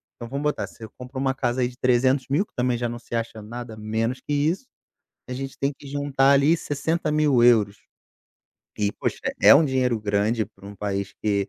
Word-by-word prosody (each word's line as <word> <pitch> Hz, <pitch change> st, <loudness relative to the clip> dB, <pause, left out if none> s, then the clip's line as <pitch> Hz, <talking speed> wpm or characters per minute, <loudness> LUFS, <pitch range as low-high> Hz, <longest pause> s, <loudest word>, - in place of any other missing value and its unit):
então, 120 Hz, -1 st, -8 dB
vamos 140 Hz, +2 st, -3 dB
botar, 150 Hz, -, 0 dB
você 110 Hz, -2 st, -11 dB
compra 125 Hz, +1 st, -9 dB
uma 135 Hz, -1 st, +1 dB
casa 130 Hz, -1 st, -1 dB
aí 120 Hz, -, +2 dB
de 125 Hz, -, -10 dB
300.000, 130 Hz, -, +2 dB
que -, -, -41 dB
também 125 Hz, -1 st, +1 dB
já 120 Hz, 0 st, -1 dB
não 120 Hz, 0 st, -5 dB
se 120 Hz, -, -7 dB
acha 115 Hz, -1 st, -3 dB
nada 115 Hz, +1 st, -8 dB
menos 110 Hz, +4 st, -2 dB
que -, -, -7 dB
isso, 160 Hz, -, 0 dB, 0.6 s
a -, -, -3 dB
gente 135 Hz, +1 st, -6 dB
tem 140 Hz, +1 st, +1 dB
que 140 Hz, -, -14 dB
juntar 140 Hz, -1 st, +2 dB
ali 140 Hz, +4 st, +4 dB
€60.000. 140 Hz, -, +2 dB, 1.0 s
E, 105 Hz, -1 st, +1 dB
poxa, -, -, -3 dB, 0.2 s
é -, -, +9 dB
um 160 Hz, -, +6 dB
dinheiro 125 Hz, -4 st, +1 dB
grande 105 Hz, +2 st, +1 dB
pra 100 Hz, -1 st, -16 dB
um 100 Hz, -, -9 dB
país 100 Hz, 0 st, -3 dB
que 100 Hz, -2 st, 0 dB
125 Hz, 195 wpm, -24 LUFS, 110-140 Hz, 1.0 s, é